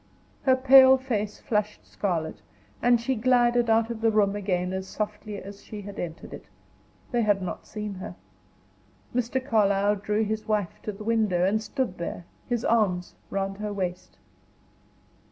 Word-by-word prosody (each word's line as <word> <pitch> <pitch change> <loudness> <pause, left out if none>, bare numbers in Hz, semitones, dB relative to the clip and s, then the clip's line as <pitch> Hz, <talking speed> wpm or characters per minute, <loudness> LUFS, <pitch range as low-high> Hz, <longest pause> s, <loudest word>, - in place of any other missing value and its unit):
Her 260 - +6
pale 265 0 +8
face 215 -6 -3
flushed 210 -1 -2
scarlet, 170 -6 -3 0.4
and 240 -1 +4
she 235 +3 -1
glided 240 0 +3
out 225 +1 +3
of 225 -1 -6
the 225 - +4
room 205 -2 +2
again 185 -2 -1
as 190 0 -4
softly 210 0 -4
as 200 +1 -10
she 210 -1 -8
had 200 0 -8
entered 165 -2 -6
it. - - -9 0.7
They 240 -2 +2
had 205 -3 +3
not 185 -2 -6
seen 210 -1 -5
her. 190 +2 -8 1.0
Mr. 250 +1 0
Carlyle 205 -5 +2
drew 210 +2 0
his 215 0 -3
wife 210 -5 -1
to 215 - -4
the 210 +1 -9
window, 215 -6 +2
and 215 +3 +1
stood 220 -4 -3
there, 170 0 -5 0.2
his 240 -2 -1
arms 190 -6 +1 0.2
round 195 0 -2
her 210 0 -3
waist. 185 -2 -4
210 Hz, 160 wpm, -26 LUFS, 195-230 Hz, 1.0 s, pale